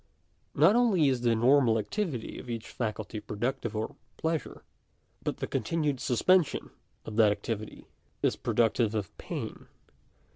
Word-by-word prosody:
Not 165 +9 +6
only 205 - +4
is 130 -2 0
the 120 -2 +3
normal 120 0 +4
activity 130 - -3
of 125 - -10
each 115 -1 -4
faculty 110 -2 -3
productive 120 +2 -3
of 110 +1 -3 0.2
pleasure, 160 -1 -2 0.6
but - - -2
the - - -3
continued 150 -5 -1
suspension 155 +7 +2 0.3
of 110 - -6
that 110 -2 +6
activity 110 0 -4 0.4
is - - +3
productive 115 -1 +1
of 100 -5 -3
pain. - - -6
120 Hz, 135 wpm, -29 LUFS, 110-150 Hz, 0.6 s, Not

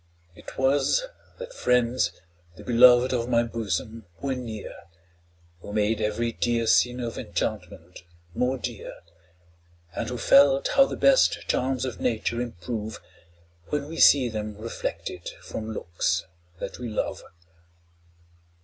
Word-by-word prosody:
'Twas 135 - +1 0.3
that - - -8
friends, 125 - +1 0.4
the - - -12
beloved 125 +1 +6
of 120 -1 -1
my 120 -1 +3
bosom, 115 -1 -4
were 140 -1 -2
near, 115 -5 -6 0.9
Who 100 - -9
made 110 +1 +1
every 110 +2 -1
dear 115 0 0
scene 125 +2 +3
of 120 -2 -4
enchantment 90 -1 -5 0.3
more 125 +7 0
dear, - - -6 1.0
And - - -3
who 125 - -4
felt 140 +2 +5
how 275 - +5
the - - -5
best 275 -1 +3
charms 130 0 0
of 130 - -5
nature 115 +1 -1
improve, 110 0 -5 0.7
When 145 +4 -2
we 165 +1 -7
see 135 -3 +6
them 105 -2 -5
reflected 105 -5 -5
from 110 0 -6
looks 85 -5 -1 0.3
that - - -7
we 120 -1 -5
love. 105 - -3
120 Hz, 125 wpm, -25 LUFS, 110-125 Hz, 1.0 s, beloved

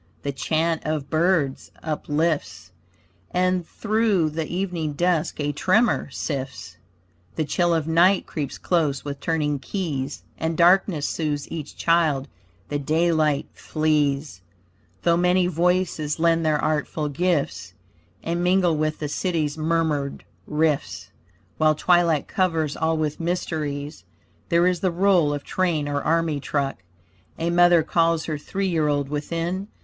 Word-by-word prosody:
The 140 - -1
chant 160 +4 0
of 155 -2 -3
birds 160 -4 +1
uplifts, 155 - -2 0.6
And 185 -1 0
through 215 -7 +1
the 160 0 -3
evening 175 -4 -2
dusk 170 0 0
a 145 0 0
tremor 210 - +2
sifts, 130 - -5 0.6
The 155 - -1
chill 175 +4 +1
of 160 -2 -1
night 175 +4 +4
creeps 145 -5 -5
close 150 -6 0
with 140 -1 -5
turning 150 -3 -1
keys, 145 -5 -4 0.2
And 160 0 -1
darkness 175 -3 +4
soothes 150 -3 -2
each 155 -3 -6
child. 160 -5 +2 0.4
The 145 - -1
daylight 155 -1 +1
flees, 145 - 0 0.6
Though 170 0 +3
many 180 +1 +3
voices 175 -3 0
lend 165 0 +2
their 155 -1 +2
artful 155 0 -1
gifts, 145 - -1 0.5
And 170 +1 -1
mingle 180 -2 +3
with 155 0 -1
the 150 - -3
city's 155 -1 -1
murmured 155 -3 -1 0.2
rifts. 150 -1 -1 0.5
While 155 0 +4
twilight 170 -2 +2
covers 165 -6 0
all 160 0 0
with 155 -1 -2
mysteries, 150 - -3 0.5
There 170 +1 +4
is 180 -1 +2
the 185 - +1
roll 175 -3 +3
of 145 -1 -3
train 170 -6 0
or 145 0 -1
army 165 -1 +1
truck; 140 -5 -2 0.6
A 165 +1 -1
mother 175 -1 +5
calls 165 0 +1
her 155 -2 -3
three 195 +6 -3
year 160 -4 +1
old 145 -1 0
within. 165 +6 -3
160 Hz, 135 wpm, -23 LUFS, 145-175 Hz, 0.6 s, mother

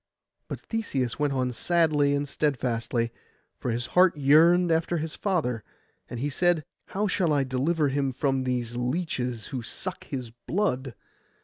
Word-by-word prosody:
But - - -5
Theseus 140 - -2
went 145 -1 +1
on 130 -1 0
sadly 150 -2 +2
and 145 0 -1
steadfastly, 120 -5 -1 0.5
for - - -3
his 120 +1 -1
heart 180 -3 +5
yearned 165 +5 +5
after 165 +1 +1
his 160 0 -3
father; 135 - -1 0.5
and 120 - -5
he 140 - 0
said, 175 +1 +2 0.2
'How 205 +2 -1
shall 185 -4 +1
I 145 -2 +3
deliver 140 +4 +1
him 135 0 0
from 135 +1 0
these 120 -2 -2
leeches 125 -3 -2
who 130 -4 -3
suck 180 +9 -5
his 125 -5 -5
blood? 130 - -2
140 Hz, 150 wpm, -27 LUFS, 125-165 Hz, 0.5 s, heart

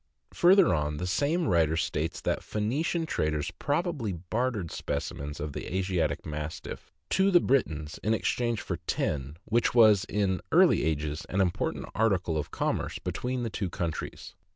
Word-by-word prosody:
Further 185 0 +6
on, 75 -2 -1
the 90 - -3
same 145 - +1
writer 80 -4 +3
states - - -2
that - - 0
Pho3nician 145 +10 -1
traders 75 - -1
probably 145 - -1
bartered 105 +1 -2
specimens 70 +1 -4
of 75 -1 -4
the - - -6
Asiatic 90 -6 0
Mastiff 75 +1 -6 0.2
to 190 +1 +4
the 180 -3 +6
Britons 80 - 0
in 110 +1 +2
exchange 120 0 0
for - - -3
tin, 70 +1 -1
which 115 +2 +1
was 105 -4 +6
in 100 -3 0
early - - +5
ages 75 -1 -1
an 95 - -1
important 90 -3 0
article 95 -7 +1
of 75 - -2
commerce - - -2
between 125 0 -3
the 115 - -3
two 95 -3 -2
countries. 85 -3 -4
95 Hz, 150 wpm, -28 LUFS, 80-120 Hz, 0.2 s, Further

